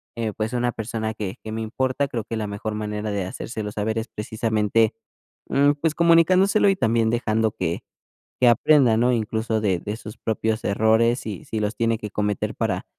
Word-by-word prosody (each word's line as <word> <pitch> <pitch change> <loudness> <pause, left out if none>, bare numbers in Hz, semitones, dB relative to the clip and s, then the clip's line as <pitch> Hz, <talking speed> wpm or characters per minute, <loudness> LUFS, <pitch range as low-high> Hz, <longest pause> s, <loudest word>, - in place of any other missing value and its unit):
eh, 115 -2 -2
pues, 110 +2 -3
una 120 0 +1
persona 110 0 -4
que 100 -3 -5
que 110 - -6
me 110 +1 -3
importa, 130 +5 -1
creo 115 -4 -4
que 115 +1 -5
la 105 -1 -2
mejor 105 +1 -4
manera 105 0 -3
de 100 -2 -2
hacérselo 105 +2 -5
saber 110 +2 -2
es, 115 +2 -2
precisamente, 110 0 0 0.6
em, 145 +1 +3
pues, 155 +2 0
comunicándoselo, 180 +5 +4
y 195 - +3
también 115 -6 +2
dejando 110 -2 +1
que 85 -4 -3 0.6
que 125 - +5
aprenda 120 -1 +5
¿no? 125 +2 +3
Incluso 110 -1 -1
de 95 -4 +1
de 105 +5 -4
sus 105 -2 -10
propios 110 0 -1
errores, 110 +4 +2
y 105 -5 -5
si 110 - -3
los 105 +1 -1
tiene 115 -1 +1
que 105 -1 -7
cometer 105 -1 -1
para - - -1
110 Hz, 190 wpm, -23 LUFS, 105-120 Hz, 0.6 s, que